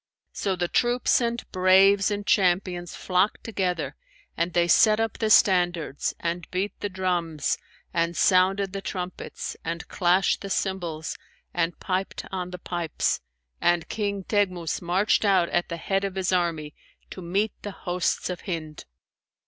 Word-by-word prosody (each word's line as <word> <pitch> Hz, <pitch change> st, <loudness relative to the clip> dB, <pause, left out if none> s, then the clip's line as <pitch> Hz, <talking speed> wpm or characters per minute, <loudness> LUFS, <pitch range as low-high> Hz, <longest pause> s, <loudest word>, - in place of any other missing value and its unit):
So 195 Hz, -2 st, -1 dB
the 175 Hz, -1 st, -1 dB
troops 245 Hz, +6 st, +2 dB
and 235 Hz, 0 st, -1 dB
braves 190 Hz, +2 st, +5 dB
and 205 Hz, -1 st, -3 dB
champions 180 Hz, -2 st, +1 dB
flocked 185 Hz, +3 st, 0 dB
together 180 Hz, -, -2 dB, 0.4 s
and 170 Hz, +2 st, 0 dB
they 175 Hz, 0 st, +3 dB
set 215 Hz, +5 st, +5 dB
up 225 Hz, -2 st, -1 dB
the 220 Hz, -, +1 dB
standards 175 Hz, -8 st, +3 dB
and 170 Hz, 0 st, -3 dB
beat 190 Hz, +3 st, -2 dB
the 205 Hz, -, -2 dB
drums 175 Hz, -5 st, -1 dB, 0.4 s
and 170 Hz, 0 st, 0 dB
sounded 190 Hz, +1 st, +3 dB
the 195 Hz, -, -4 dB
trumpets 185 Hz, -2 st, -5 dB
and 165 Hz, 0 st, -4 dB
clashed 180 Hz, +1 st, +2 dB
the 200 Hz, -, -6 dB
cymbals 175 Hz, -5 st, -2 dB, 0.4 s
and 170 Hz, 0 st, -1 dB
piped 190 Hz, 0 st, -2 dB
on 180 Hz, -2 st, -3 dB
the 180 Hz, -, -7 dB
pipes; 175 Hz, -3 st, -2 dB, 0.4 s
and 175 Hz, -1 st, +2 dB
King 200 Hz, -2 st, -2 dB
Teghmus 185 Hz, -5 st, 0 dB
marched 185 Hz, +6 st, +2 dB
out 190 Hz, -4 st, +3 dB
at 175 Hz, -, 0 dB
the 170 Hz, -, -4 dB
head 195 Hz, +4 st, -1 dB
of 195 Hz, -1 st, -3 dB
his 190 Hz, -1 st, 0 dB
army, 165 Hz, -4 st, 0 dB, 0.4 s
to 185 Hz, -, -7 dB
meet 195 Hz, +5 st, 0 dB
the 205 Hz, -, -5 dB, 0.2 s
hosts 180 Hz, 0 st, 0 dB
of 180 Hz, -, -6 dB
Hind. 155 Hz, -4 st, -5 dB
185 Hz, 150 wpm, -26 LUFS, 175-195 Hz, 0.4 s, braves